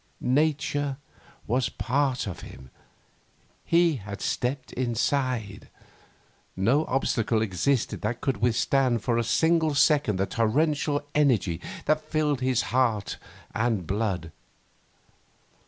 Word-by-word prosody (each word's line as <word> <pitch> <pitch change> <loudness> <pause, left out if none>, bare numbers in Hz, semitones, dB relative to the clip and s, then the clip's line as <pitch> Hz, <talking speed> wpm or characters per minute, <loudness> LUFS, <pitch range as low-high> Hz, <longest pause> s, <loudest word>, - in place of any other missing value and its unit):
Nature 145 0 +1 0.5
was 125 +3 0
part 130 0 0
of 95 -4 -6
him. 65 -2 -12 0.9
He 170 -3 +3
had 100 -2 -8
stepped 130 +2 -2
inside. 120 -3 -1 0.9
No 120 +12 +2
obstacle 115 -4 0
existed 110 +6 0
that 115 +3 -2
could 135 -5 -1
withstand 120 +1 +1
for 120 -1 +1
a - - +1
single 160 +3 +2
second 145 - +3
the 95 - +1
torrential 145 +6 0
energy 115 - +2 0.2
that 155 0 +2
fired 150 -4 0
his 130 -1 +1
heart 115 -6 +1 0.4
and 110 -5 0
blood. 95 -4 -2
125 Hz, 105 wpm, -26 LUFS, 110-145 Hz, 0.9 s, He